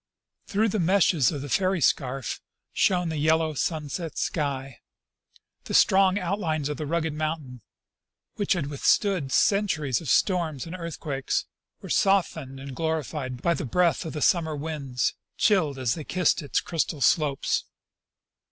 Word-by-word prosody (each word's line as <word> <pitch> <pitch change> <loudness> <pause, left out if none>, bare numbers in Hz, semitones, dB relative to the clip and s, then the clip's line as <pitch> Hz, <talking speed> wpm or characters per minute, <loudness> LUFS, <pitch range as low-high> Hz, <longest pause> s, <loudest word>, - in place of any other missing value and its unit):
Through 220 +2 +1
the 210 - -1
meshes 175 -5 +3
of 145 -3 -5
the - - -5
fairy 185 +5 +1
scarf 135 -3 0 0.3
shone 180 -3 +2
the 160 - -3
yellow 160 +1 +2
sunset 155 +2 -3
sky. 135 -4 -2 0.9
The - - -3
strong 190 0 +5
outlines 170 -6 -1
of 150 - -3
the 155 - -4
rugged 160 0 -1
mountain, 155 -5 -4 0.7
which 205 - +1
had 175 -6 -2
withstood 150 +2 +1
centuries 155 - +2
of 155 - -6
storms 165 - +1
and 170 +2 -7
earthquakes, 155 -5 -3 0.4
were - - -8
softened 160 -9 +1
and 135 -1 -8
glorified 150 -5 -3
by 170 - +3
the 150 - -4
breath 170 +6 +1
of 160 - -6
the 150 - -2
summer 165 -5 +2
winds, 140 -4 -2 0.2
chilled 180 -10 +2
as 125 -3 0
they 160 - -6
kissed 180 +2 +1
its 145 - -1
crystal 160 -3 -2
slopes. 140 +1 +2
155 Hz, 145 wpm, -26 LUFS, 140-180 Hz, 0.9 s, strong